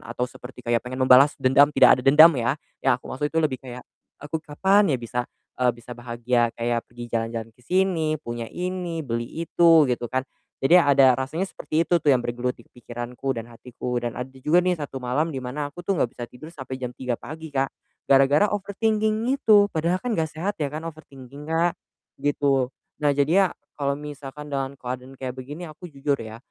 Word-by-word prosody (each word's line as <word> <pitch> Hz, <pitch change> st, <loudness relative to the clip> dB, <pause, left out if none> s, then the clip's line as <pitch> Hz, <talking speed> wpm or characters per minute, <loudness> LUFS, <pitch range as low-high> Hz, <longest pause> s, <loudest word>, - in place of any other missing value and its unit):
atau 125 Hz, +1 st, -1 dB
seperti 125 Hz, 0 st, -11 dB
kayak 120 Hz, 0 st, +1 dB
pengen 130 Hz, +1 st, -2 dB
membalas 130 Hz, +3 st, +6 dB
dendam, 135 Hz, +3 st, +5 dB
tidak 130 Hz, -, +6 dB
ada -, -, -11 dB
dendam 155 Hz, +4 st, +9 dB
ya, 125 Hz, +1 st, 0 dB, 0.2 s
yang 130 Hz, -2 st, +3 dB
aku -, -, -25 dB
maksud 145 Hz, +3 st, -1 dB
itu 160 Hz, -, -7 dB
lebih 140 Hz, -5 st, -1 dB
kayak, 125 Hz, -1 st, -9 dB, 0.4 s
aku 145 Hz, +2 st, -4 dB
kapan 190 Hz, +4 st, +3 dB
ya 130 Hz, -, 0 dB
bisa, 120 Hz, +1 st, -2 dB, 0.4 s
eee, 125 Hz, -1 st, +2 dB
bisa 120 Hz, +1 st, -11 dB
bahagia 120 Hz, 0 st, 0 dB
kayak 120 Hz, 0 st, -2 dB
pergi 120 Hz, 0 st, -10 dB
jalan-jalan 115 Hz, 0 st, -2 dB
ke 125 Hz, -, -24 dB
sini, 175 Hz, -3 st, +1 dB
punya 120 Hz, -3 st, -5 dB
ini, 180 Hz, -2 st, -3 dB
beli 120 Hz, -5 st, -3 dB, 0.2 s
itu, 165 Hz, -4 st, +5 dB
gitu 120 Hz, -1 st, -1 dB
kan. 130 Hz, -, +2 dB, 0.4 s
Jadi, 165 Hz, +7 st, +5 dB
ada 135 Hz, -5 st, +5 dB
rasanya 155 Hz, +9 st, -3 dB
seperti 160 Hz, -2 st, -1 dB
itu 175 Hz, -, +4 dB
tuh 150 Hz, -3 st, +3 dB
yang 130 Hz, -, +3 dB
bergelut 120 Hz, +1 st, -2 dB
di -, -, -19 dB
pikiranku 120 Hz, +2 st, -5 dB
dan 115 Hz, -1 st, -7 dB
hatiku, 125 Hz, +1 st, -6 dB
dan 120 Hz, -1 st, -3 dB
ada 125 Hz, -, -4 dB
juga 165 Hz, +6 st, +4 dB
nih 180 Hz, 0 st, +1 dB
satu 140 Hz, -3 st, -6 dB
malam 145 Hz, +6 st, -1 dB
di 135 Hz, -, -4 dB
mana 145 Hz, +3 st, -4 dB
aku 175 Hz, -, -9 dB
tuh 190 Hz, +1 st, 0 dB
nggak 125 Hz, -, +1 dB
bisa 120 Hz, -, -6 dB
tidur 155 Hz, +6 st, -12 dB
sampai 130 Hz, -4 st, -7 dB
jam 125 Hz, -1 st, -5 dB
03:00 125 Hz, -1 st, -3 dB
pagi 160 Hz, +5 st, -9 dB
Kak, 135 Hz, -1 st, 0 dB, 0.4 s
gara-gara 140 Hz, +9 st, +4 dB
overthinking 215 Hz, +3 st, 0 dB
itu, 215 Hz, -7 st, +5 dB
padahal 170 Hz, +3 st, +1 dB
kan 245 Hz, -, -2 dB
nggak 160 Hz, -6 st, 0 dB
sehat 190 Hz, +6 st, -3 dB
ya 145 Hz, -, 0 dB
kan 155 Hz, +2 st, -5 dB
overthinking, 145 Hz, -3 st, -10 dB
Kak, 165 Hz, +1 st, +2 dB, 0.5 s
gitu. 140 Hz, -2 st, +1 dB, 0.3 s
Nah, 145 Hz, -, +3 dB
jadinya 170 Hz, +7 st, +4 dB, 0.3 s
kalau 140 Hz, -1 st, -1 dB
misalkan 150 Hz, 0 st, -9 dB
dengan 135 Hz, 0 st, -2 dB
keadaan 130 Hz, +1 st, -7 dB
kayak 130 Hz, -1 st, -5 dB
begini 145 Hz, +7 st, -7 dB
aku 160 Hz, +4 st, -11 dB
jujur 140 Hz, -1 st, -1 dB
ya, 110 Hz, 0 st, -8 dB
135 Hz, 195 wpm, -24 LUFS, 125-160 Hz, 0.5 s, dendam